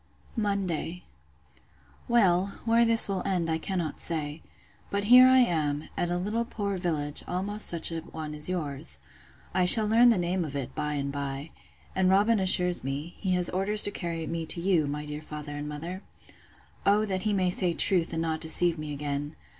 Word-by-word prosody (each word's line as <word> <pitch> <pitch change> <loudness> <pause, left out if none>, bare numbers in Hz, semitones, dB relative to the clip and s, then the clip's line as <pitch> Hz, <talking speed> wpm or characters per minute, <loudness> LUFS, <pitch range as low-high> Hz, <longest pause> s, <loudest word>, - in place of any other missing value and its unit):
Monday. 190 -6 -2 1.0
Well, 200 -5 +2
where 230 +1 +4
this 230 0 +5
will 195 -2 -2
end, 175 -4 -1
I 160 - -1
cannot 170 -3 -4
say. 155 -2 -3 0.5
But 200 0 -1
here 250 +4 +8
I 260 0 +5
am, 155 - 0
at 175 - -1
a 175 - -1
little 210 +6 -2
poor 205 -4 -4
village, 155 -5 -2
almost 205 +4 0
such 170 -1 -1
a 165 - -3
one 155 -1 -8
as 150 +3 +1
yours! 140 - -4 0.6
I 185 - +2
shall 215 +3 +8
learn 230 +3 +5
the 230 - +3
name 175 +1 -1
of 145 -3 -7
it 140 -3 -5
by 150 0 -3
and 140 -1 -3
by: 140 +1 -5 0.4
and 190 -1 +2
Robin 205 +3 +3
assures 180 -1 +3
me, 140 +6 -5
he 190 -2 -1
has 180 -1 0
orders 200 +3 +3
to 205 - +4
carry 170 -4 -4
me 165 0 -4
to 170 - -1
you, 170 -4 +1
my 150 +1 -4
dear 150 0 -7
father 150 -1 -8
and 145 0 -6
mother. 170 +6 -7 0.8
O 210 +2 +3
that 190 -3 -3
he 215 - -1
may 185 -3 +1
say 180 -1 +2
truth, 170 0 +1
and 165 0 -2
not 160 -1 -3
deceive 165 +1 +3
me 150 -1 -5
again! 145 0 -4
175 Hz, 190 wpm, -27 LUFS, 150-195 Hz, 1.0 s, here